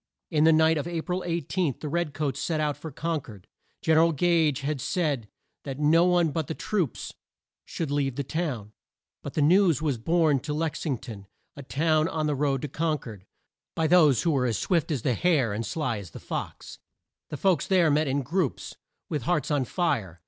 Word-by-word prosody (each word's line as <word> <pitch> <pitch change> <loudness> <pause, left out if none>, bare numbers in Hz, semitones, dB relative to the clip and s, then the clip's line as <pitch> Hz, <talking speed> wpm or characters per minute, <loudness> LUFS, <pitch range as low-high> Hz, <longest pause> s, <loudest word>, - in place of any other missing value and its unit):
In 155 -1 +3
the 160 - +7
night 160 0 +4
of 150 - -4
A 170 -2 -3
pril 180 0 -2
18, 170 -2 -1
the 155 - -5
red 165 0 -2
coats 145 -3 -2
set 160 0 -1
out 150 -1 0
for 160 - -8
Con 160 0 -2
cord. 105 -8 -13 0.4
Gen 160 -1 +3
er - - +7
al 165 0 +3
Gage 155 -3 +2
had 140 -1 -2
said 145 - -1 0.4
that 135 -2 -5
no 155 +4 +4
one 175 -3 +3
but 160 -1 -2
the 160 - -4
troops 180 - -2 0.5
should 160 -4 -4
leave 140 -3 0
the 140 - -2
town, 130 -9 -4 0.5
but 145 - -8
the 150 - +2
news 175 -1 +4
was 145 -6 -1
borne 160 +1 +2
to 150 +3 -4
Lex 160 +1 -2
ing 135 -4 0
ton 110 -5 -10 0.3
a 140 - -8
town 155 +3 +1
on 160 -4 -2
the 150 - +1
road 140 -2 0
to - - -1
Con 155 +2 -1
cord 105 -8 -11 0.5
by 160 - 0
those 155 -7 +5
who 170 - +2
were 130 -4 +1
as 115 -4 0
swift 170 - 0
as 140 -8 -2
the 125 - +2
hare, 135 - +2
and 110 +3 -2
as - - -5
sly 130 -7 -2
as 95 -4 -9
the - - -10
fox. - - -6 0.5
The 150 - -5
folks 185 -3 +1
there 180 -5 +4
met 150 +1 +2
in 135 +1 0
groups, 165 +1 -2 0.3
with 150 -3 -2
hearts 160 -5 0
on 140 -3 +1
fire. 110 - -1
150 Hz, 215 wpm, -26 LUFS, 135-165 Hz, 0.5 s, the